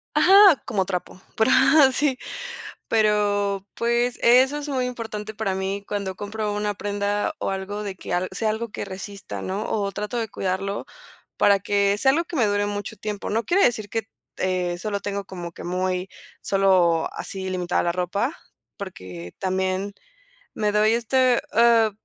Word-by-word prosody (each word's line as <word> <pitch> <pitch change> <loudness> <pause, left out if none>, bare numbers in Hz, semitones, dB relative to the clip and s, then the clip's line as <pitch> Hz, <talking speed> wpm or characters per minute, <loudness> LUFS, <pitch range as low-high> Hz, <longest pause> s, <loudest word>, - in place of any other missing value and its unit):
Ajá, 390 -5 +7
como 195 -3 0
trapo, 185 0 -5 0.2
pero 220 - +3 0.4
sí, 270 -1 +1 0.7
pero, 205 -2 +1
pues, 235 +1 0
eso 260 +4 +5
es 295 0 -5
muy 260 -3 0
importante 220 -3 -5
para 205 -3 -2
mí 195 +1 -3
cuando 200 -2 -3
compro 210 +1 -3
una 210 0 -1
prenda 205 0 -1
o - - -2
algo 195 +2 -4
de 200 -2 -5
que 185 - -6
alg 180 +1 0
sea 220 - -1
algo 225 +2 -4
que - - -5
resista, 195 +1 -7
¿no?, 195 +3 -3
o 200 -2 -1
trato 210 +4 -4
de 225 -2 -2
cuidarlo, 195 +1 -2 0.5
para 200 -1 +5
que 200 0 +1
sea 265 +5 +4
algo 330 +5 +1
que 335 - -7
me 245 -6 +3
dure 205 0 +1
mucho 205 -1 -4
tiempo, 210 0 -4
no 225 +2 0
quiere 385 +3 +3
decir 215 -3 0
que 225 +1 -2 0.3
te, 180 -1 -1
eh, - - -5
solo 200 +2 -3
tengo 200 0 -4
como 175 -2 -7
que - - -10
muy 185 +1 -1 0.3
solo 185 -4 +3
así 190 -1 -5
limitada 180 -1 0
la 175 - +1
ropa, 190 - -2 0.4
porque 95 - -8
también 190 +1 -1 0.6
me 210 -1 0
doy 210 +1 +4
este, 250 +1 +2
eh, 230 -1 +5
205 Hz, 170 wpm, -24 LUFS, 190-225 Hz, 0.7 s, Ajá